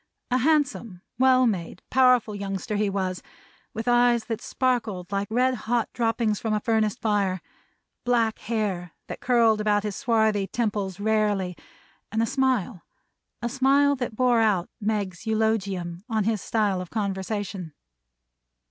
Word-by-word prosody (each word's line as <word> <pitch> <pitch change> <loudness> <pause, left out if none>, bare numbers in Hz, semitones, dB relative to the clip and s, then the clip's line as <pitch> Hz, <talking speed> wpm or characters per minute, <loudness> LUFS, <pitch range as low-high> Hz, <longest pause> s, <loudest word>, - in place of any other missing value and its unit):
A 255 - +3
handsome, 255 - 0 0.2
well 255 -1 +5
made, 180 -6 -2
powerful 250 -4 +4
youngster 200 0 -4
he 205 0 +1
was; 190 -2 -2 0.5
with 225 +3 -6
eyes 240 -1 +4
that 225 -2 -4
sparkled 225 -8 -1
like 200 0 -1
the 220 - -4
red 255 +1 +3 0.2
hot 240 -2 0
droppings 225 -2 0
from 220 -2 -1
a - - +1
furnace 220 -2 +1
fire; 200 -4 0 0.6
black 235 -3 +1
hair 200 -7 -2
that - - -7
curled 230 -3 +3
about 205 -1 +2
his 210 -2 -3
swarthy 220 -6 +1
temples 205 -5 -2
rarely; 205 -4 +1 0.6
and 225 +1 +1
a - - +2
smile 250 -7 0 0.6
a - - +1
smile 275 +2 +3
that 245 -4 -4
bore 245 -1 +3
out 200 -6 +1
Meg's 205 -2 -2
eulogium 200 -5 -1
on 220 -2 +1
his 215 -1 0
style 205 -5 0
of 180 - -8
conversation. 195 -4 -3
215 Hz, 145 wpm, -25 LUFS, 195-240 Hz, 0.6 s, well